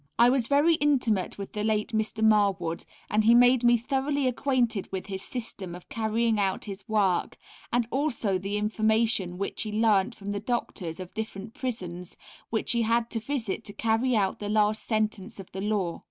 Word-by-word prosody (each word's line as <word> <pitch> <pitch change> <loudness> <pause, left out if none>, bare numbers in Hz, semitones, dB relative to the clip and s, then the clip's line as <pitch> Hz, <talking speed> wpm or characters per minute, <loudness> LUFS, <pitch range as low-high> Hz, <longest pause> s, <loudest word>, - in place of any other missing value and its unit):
I 240 +1 +6
was 255 -3 +1
very 290 +4 +4
intimate 250 - +1
with 200 -1 -7
the 210 - -2
late 215 -1 0
Mr. 220 0 -1
Marwood, 195 -6 +2 0.2
and 215 +1 +2
he 230 +2 +6
made 245 0 +5
me 240 0 +6
thoroughly 275 +3 -1
acquainted 245 -4 0
with 190 -1 -4
his 190 -2 -5
system 200 -7 -5
of 180 - -12
carrying 225 0 0
out 195 -2 0
his 200 +2 -8
work, 200 -5 +1 0.3
and 240 -1 +1
also 240 -9 0
the 200 +2 -2
information 215 -3 +1
which 200 - -3
he 215 - -3
learnt 215 0 +2
from 200 -1 -6
the 205 - -2
Doctors 200 -7 -3
of 185 -1 -8
different 220 -1 -6
Prisons 180 - -5 0.3
which 220 - -1
he 235 - +2
had 230 +1 +1
to 225 - -1
visit 225 -3 -3
to 205 - -6
carry 230 +4 +1
out 195 -3 +1
the 205 - -4
last 215 0 +2
sentence 215 -1 -2
of 190 - -10
the 190 - -5
law. 195 -5 -1
220 Hz, 185 wpm, -27 LUFS, 200-235 Hz, 0.3 s, I